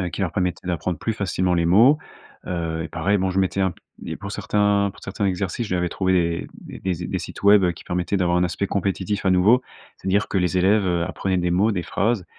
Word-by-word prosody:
heu, 90 - -1
qui - - -6
leur 90 -4 -1
permettaient 90 0 -2
d'apprendre 85 -1 -2
plus 115 - -2
facilement 95 -3 0
les 85 -1 +1
mots. 110 - +6 0.5
Heu, 80 -2 -2
et 80 - -6
pareil, 90 +5 0
bon, 95 -1 0
je 95 +1 +1
mettais 95 +1 0
un 95 - +2
p - - -16 0.3
et - - -4
pour - - -7
certains 105 -1 +1
pour - - -17
certains 100 +1 -2
exercices, 95 +4 -2
je - - -11
lui - - +2
avais 90 0 0
trouvé 90 -3 0
des - - -10
des 90 -2 -2
des - - -2
sites - - -8
web 100 -3 +5
qui 85 - -13
permettaient 90 +3 -1
d'avoir 90 -2 +1
un 90 - +3
aspect 95 +2 -2
compétitif 100 +1 -2
à - - +4
nouveau. 100 +7 +5 0.4
C'est-à-dire 100 +2 0
que 95 - 0
les 90 0 0
élèves, 100 +3 +3
heu, 85 -1 +1
apprenaient 95 +2 -2
des 90 0 0
mots, 100 +6 +2
des 90 -3 -2
phrases. 100 +2 0
95 Hz, 240 wpm, -22 LUFS, 90-100 Hz, 0.5 s, mots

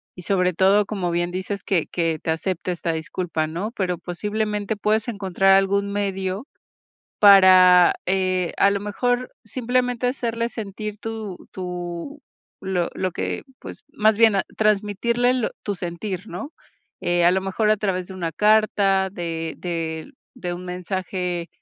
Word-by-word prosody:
y 180 - -10
sobre 180 0 +1
todo, 195 +4 +4
como 190 -4 -2
bien 175 0 0
dices, 190 +2 -4
que 185 -7 +1
que 165 -2 0
te 160 - -1
acepte 180 +2 -2
esta 170 -1 -2
disculpa, 160 0 -2
¿no, 175 +8 -4
pero 180 -3 -1
posiblemente 210 +3 -2
puedes 215 +2 +1
encontrar 195 -3 +2
algún 200 +1 +2
medio 195 +3 -2 0.7
para, 185 -3 +8
eh, 185 -2 +1
a 200 - +5
lo 200 0 -1
mejor 245 +4 -1
simplemente 245 +1 -1
hacerle 235 -2 -1
sentir 210 -1 -6
tu 220 -4 -6 0.2
tu 180 - -6 0.4
lo 185 -3 -1
lo 185 - -1
que, 90 -1 -3 0.2
pues, - - -10
más 215 0 +2
bien, 220 -3 +5
a - - +1
transmitirle 215 +4 +2
lo 250 -3 0
tu 205 - -1
sentir, 185 +3 -5
¿no?, 285 +3 -7 0.5
a 175 0 +3
lo 190 - +1
mejor 210 +3 0
a 215 - +4
través 185 -3 -2
de 190 - -8
una 170 -3 -3
carta, 205 0 +3
de 165 -3 -4
de 165 -2 -4 0.2
de 175 -1 -4
un 180 +1 -8
mensaje, 180 -1 -3
190 Hz, 150 wpm, -23 LUFS, 180-210 Hz, 0.7 s, para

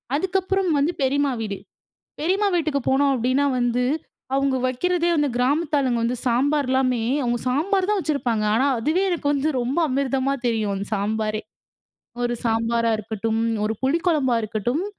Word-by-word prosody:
அதுக்கப்புறம் 380 +2 0
வந்து 285 +5 +2
பெரிம்மா 280 +1 +2
வீடு, 200 -3 -3 0.6
பெரிம்மா 385 +6 +1
வீட்டுக்கு 310 -4 0
போனோம் 275 +1 +3
அப்டின்னா 255 +3 +1
வந்து 245 0 +1 0.5
அவங்க 275 -1 +1
வைக்கிறதே 345 +7 0
வந்து 295 -2 +1
கிராமத்து 295 +5 +1
ஆளுங்க 255 -4 +1
வந்து 245 +2 0
சாம்பார்லாமே 260 -1 +1 0.2
அவங்க 240 -1 0
சாம்பார் 370 +9 +1
தான் 420 -1 +2
வச்சிருப்பாங்க 275 - -1
ஆனா 260 +4 +2
அதுவே 310 +10 +1
எனக்கு 340 -5 -2
வந்து 285 +2 0
ரொம்ப 250 +5 -2
அமிர்தமா 270 0 0
தெரியும் 220 -3 0
அந்த 195 +1 -4
சாம்பாரே. 215 +1 -1 0.8
ஒரு 240 0 0
சாம்பாரா 230 0 +1
இருக்கட்டும் 220 +1 -2 0.2
ஒரு 215 - 0
புளி 270 +5 +2
குழம்பா 280 -8 +2
இருக்கட்டும் 220 - -2
265 Hz, 145 wpm, -23 LUFS, 235-300 Hz, 0.8 s, போனோம்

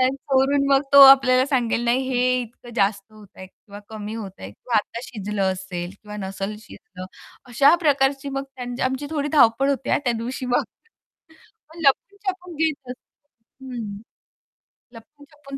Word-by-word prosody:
चोरून 275 +1 +1
मग 275 0 +5
तो 280 - +10
आपल्याला 260 -1 +7
सांगेल, 245 -4 0
"नाही, 260 +2 0
हे 250 0 +1
इतकं 240 +1 -12
जास्त 200 -2 +1
होतंय 205 -3 -14
किंवा 200 +2 -14
कमी 215 0 -7
होतंय 190 - -8
किंवा 230 - -5
आता 230 +2 -3
शिजलं 205 -4 -2
असेल 185 -1 -6
किंवा 210 0 -9
नसलं 195 +2 -5
शिजलं." 185 -3 -12 0.4
अशा 275 +7 +5
प्रकारची 275 -1 +1
मग 275 0 -3
त्यांची 245 0 -6
आमची 265 +2 -2
थोडी 295 -2 -2
धावपळ 270 +2 +4
होती 270 -1 -2
हा - - +3
त्या 240 - +1
दिवशी 245 +3 -5
मग. 245 -1 +1 1.1
मग 330 - -14
लपून-छपून 375 +3 -2
घेत 295 -4 -2
असतो 265 0 -19
हं, 210 -5 -6 0.9
लपून-छपून 285 +3 -13
250 Hz, 145 wpm, -22 LUFS, 215-275 Hz, 1.1 s, तो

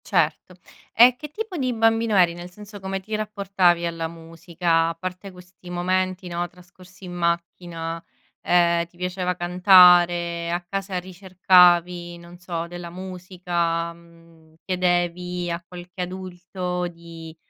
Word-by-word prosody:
Certo. - - 0 0.4
E 245 +2 +7
che 300 +4 -9
tipo 425 +3 -6
di 255 -3 -1
bambino 225 -1 +2
eri? 175 -2 +4
Nel 175 +1 -9
senso 205 +2 -12
come 190 0 -4
ti 215 +3 -5
rapportavi 195 -5 +1
alla 165 -1 -3
musica? 165 0 -1
A 165 - -5
parte 185 +3 -7
questi 180 0 -15
momenti, 185 +1 -1
no, 175 0 -2
trascorsi 180 +2 -17
in 180 - -8
macchina, 170 -1 -3 0.4
ehm, 170 -1 +2
ti 175 - -26
piaceva 180 0 -2
cantare? 175 -1 +5
A 175 - 0
casa 195 0 -3
ricercavi, 180 -1 +3
non 170 +1 -14
so, 170 -2 -4
della 175 0 -8
musica? 175 -2 -3
Mhmm, 165 -1 -21
chiedevi 180 -1 -1
a 170 +1 -4
qualche 180 +1 -9
adulto 180 0 -5
di, 165 -1 -11
180 Hz, 135 wpm, -23 LUFS, 170-185 Hz, 0.4 s, E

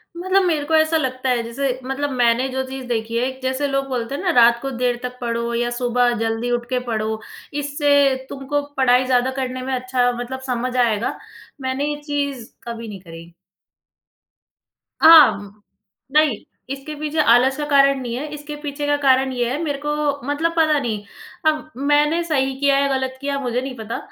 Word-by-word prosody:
मतलब 375 +2 +2
मेरे 310 -4 +1
को 320 - +1
ऐसा 315 +1 +3
लगता 260 -2 -2
है, 245 -2 +2
जैसे 255 +2 -2
मतलब 280 +2 -2
मैंने 245 +1 +2
जो 265 0 -2
चीज़ 265 -1 -7
देखी 230 -1 -2
है, 255 +2 0
जैसे 260 +2 -1
लोग 275 0 -1
बोलते 250 +1 -3
हैं 345 - -5
ना 370 - 0
रात 235 0 +6
को 270 0 -4
देर 245 -1 -1
तक 250 0 -5
पढ़ो 235 0 -2
या 240 +1 0
सुबह 245 0 +2
जल्दी 225 +2 -1
उठ 240 0 -1
के 255 -1 0
पढ़ो। 220 -1 -2 0.3
इससे 285 -1 +2
तुमको 280 +1 -2 0.2
पढ़ाई 255 -1 +4
ज़्यादा 255 0 +2
करने 255 -1 -4
में 260 +1 -3
अच्छा, 250 -1 +1
मतलब 245 +2 -5
समझ 250 0 -2
आएगा, 230 -2 +1 0.4
मैंने 260 +2 -1
ये 295 - -8
चीज़ 280 -5 -3
कभी 230 -1 -6
नहीं 200 -3 -8
करी। 165 -1 -12 1.7
आह! 320 -1 +9 0.8
नहीं। 300 -7 +3 0.3
इसके 275 +2 -6
पीछे 305 +1 -2
आलस 260 +3 +4
का 295 - -2
कारण 275 -1 +4
नहीं 240 -1 -4
है। 290 +4 -4
इसके 295 0 -7
पीछे 290 0 -4
का 290 - +3
कारण 265 -1 +3
ये 240 -1 -1
है 265 - -2
मेरे 290 -3 -2
को 295 - 0 0.4
मतलब 315 +4 0
पता 310 -2 +4
नहीं, 220 -5 -3 0.4
अब 310 0 0
मैंने 295 +4 +2
सही 270 -5 0
किया 280 -1 +3
या 280 0 +2
गलत 260 0 -4
किया 280 0 -2
मुझे 250 -1 -2
नहीं 265 -1 -6
पता 220 +1 -5
260 Hz, 185 wpm, -21 LUFS, 245-285 Hz, 1.7 s, आह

